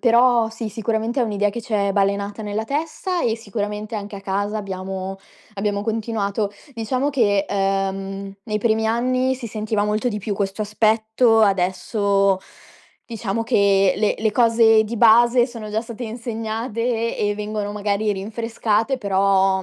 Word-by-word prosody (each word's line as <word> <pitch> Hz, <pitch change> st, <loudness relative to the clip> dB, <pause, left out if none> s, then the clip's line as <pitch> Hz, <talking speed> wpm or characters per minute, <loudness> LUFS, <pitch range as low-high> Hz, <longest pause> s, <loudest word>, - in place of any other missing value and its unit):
però 235 Hz, -1 st, +4 dB
sì, 225 Hz, 0 st, -5 dB
sicuramente 225 Hz, +3 st, -1 dB
è -, -, +4 dB
un'idea 205 Hz, -2 st, 0 dB
che 235 Hz, +3 st, -6 dB
ci 225 Hz, -, -9 dB
è 200 Hz, -1 st, +1 dB
balenata 200 Hz, +2 st, 0 dB
nella 210 Hz, +1 st, -3 dB
testa 320 Hz, -, -2 dB
e 225 Hz, -1 st, +1 dB
sicuramente 210 Hz, 0 st, -4 dB
anche 205 Hz, -1 st, -5 dB
a -, -, -8 dB
casa 200 Hz, +2 st, -2 dB
abbiamo 190 Hz, -1 st, -5 dB, 0.4 s
abbiamo 200 Hz, 0 st, -1 dB
continuato. 215 Hz, -2 st, -1 dB, 0.2 s
Diciamo 255 Hz, +4 st, -1 dB
che, 205 Hz, -7 st, +2 dB
ehm, 195 Hz, 0 st, -2 dB
nei 215 Hz, -2 st, -2 dB
primi 220 Hz, 0 st, +1 dB
anni 255 Hz, +3 st, +1 dB
si 250 Hz, -2 st, -7 dB
sentiva 215 Hz, -1 st, -1 dB
molto 215 Hz, +3 st, 0 dB
di 210 Hz, -3 st, -3 dB
più 210 Hz, 0 st, -3 dB
questo 200 Hz, +1 st, -2 dB
aspetto, 220 Hz, +2 st, +2 dB
adesso 195 Hz, +1 st, +2 dB, 0.7 s
diciamo 225 Hz, -1 st, -3 dB
che 195 Hz, -3 st, +3 dB
le 210 Hz, 0 st, +1 dB
le 220 Hz, 0 st, +1 dB
cose 225 Hz, -1 st, +5 dB
di 225 Hz, +2 st, -5 dB
base 235 Hz, +2 st, +6 dB
sono 230 Hz, -4 st, -8 dB
già 215 Hz, +2 st, -1 dB
state 235 Hz, +1 st, -7 dB
insegnate 230 Hz, 0 st, -3 dB
e 205 Hz, 0 st, +1 dB
vengono 210 Hz, 0 st, -3 dB
magari 210 Hz, +1 st, 0 dB
rinfrescate, 225 Hz, +4 st, -1 dB
però 195 Hz, -3 st, +2 dB
215 Hz, 150 wpm, -21 LUFS, 200-230 Hz, 0.7 s, base